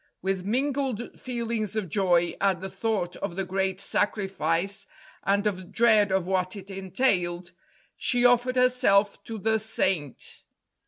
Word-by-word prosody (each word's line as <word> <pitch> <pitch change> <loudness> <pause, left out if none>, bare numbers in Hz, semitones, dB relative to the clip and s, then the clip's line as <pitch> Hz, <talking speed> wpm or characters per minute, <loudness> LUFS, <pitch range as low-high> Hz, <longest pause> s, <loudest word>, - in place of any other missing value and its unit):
With 190 0 -1
mingled 260 0 -1
feelings 230 -4 -3
of 215 -4 -1
joy 175 -1 +2
at 195 -3 +2
the 190 +1 -6
thought 210 -6 -2
of 195 -4 -4
the 195 0 -2
great 190 0 -1
sacrifice, 195 -3 0 0.3
and 200 +1 +1
of 185 -3 -2
dread 215 -4 +4
of 190 -2 +1
what 185 +1 -1
it 200 0 -9
entailed, 185 -3 0 0.4
she 245 -1 +1
offered 245 +1 +4
herself 250 -6 +3
to 225 -1 -5
the 220 +2 +1
Saint. 185 - -2
200 Hz, 140 wpm, -27 LUFS, 185-225 Hz, 0.4 s, dread